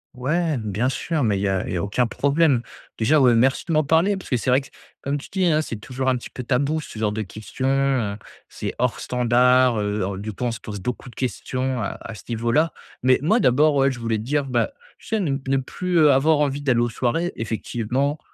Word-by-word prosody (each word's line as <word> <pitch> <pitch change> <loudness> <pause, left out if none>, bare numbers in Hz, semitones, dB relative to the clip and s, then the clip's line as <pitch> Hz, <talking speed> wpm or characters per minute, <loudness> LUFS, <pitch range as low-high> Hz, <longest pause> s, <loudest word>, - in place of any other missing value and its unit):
Ouais, 155 +3 0
bien 110 +4 -1
sûr, 155 +1 -1
mais 100 -4 +1
il - - -3
y 100 - +1
a 95 -1 -1
il - - -3
y - - 0
a 85 - -1
aucun 105 +5 +1
problème. 140 +2 +2 0.4
Déjà, 145 +8 +4
ouais, 125 -3 +5
merci 130 +4 +2
de - - -2
m'en 155 - +3
parler, 165 +7 +3
parce 190 - -9
que 125 - +2
c'est 125 +2 0
vrai, 130 - +4 0.4
comme 140 +1 -1
tu 140 - -9
dis, 190 -1 +1
hein, 155 -2 +2
c'est 115 - -5
toujours 125 +5 -5
un 130 - +3
petit - - -9
peu 125 - -7
tabou 140 +5 0
ce 110 - -9
genre 105 -1 +1
de 110 +1 -3
questions, 110 +6 -7
heu, 135 -6 +1 0.3
c'est - - -5
hors 125 -1 0
standard, 125 -1 +3
heu, 105 -2 -2
du 105 +2 -5
coup, 115 - -7
on 120 - +1
se 115 - -6
pose 105 -2 -7
beaucoup 125 +3 -4
de - - -16
questions 130 -1 -2
à 100 - -3
à 115 - -8
ce 105 - -10
niveau-là. 120 +8 +1 0.3
Mais, 130 0 +4
moi, 215 +9 +3
d'abord, 145 - +4
ouais, 135 0 +4
je 125 - -7
voulais 115 -2 -1
te 110 - -6
dire, 145 +2 0
bah, 125 - 0 0.3
tu - - -17
sais 220 - 0
ne 150 -8 0
ne 135 0 +2
plus, 175 +7 -2
heu, 150 -3 +6
avoir 150 +3 +4
envie 145 -1 0
d'aller 130 -4 +2
aux 120 - +2
soirées, 130 +10 -1
effectivement, 120 +6 -2
130 Hz, 240 wpm, -23 LUFS, 115-145 Hz, 0.4 s, heu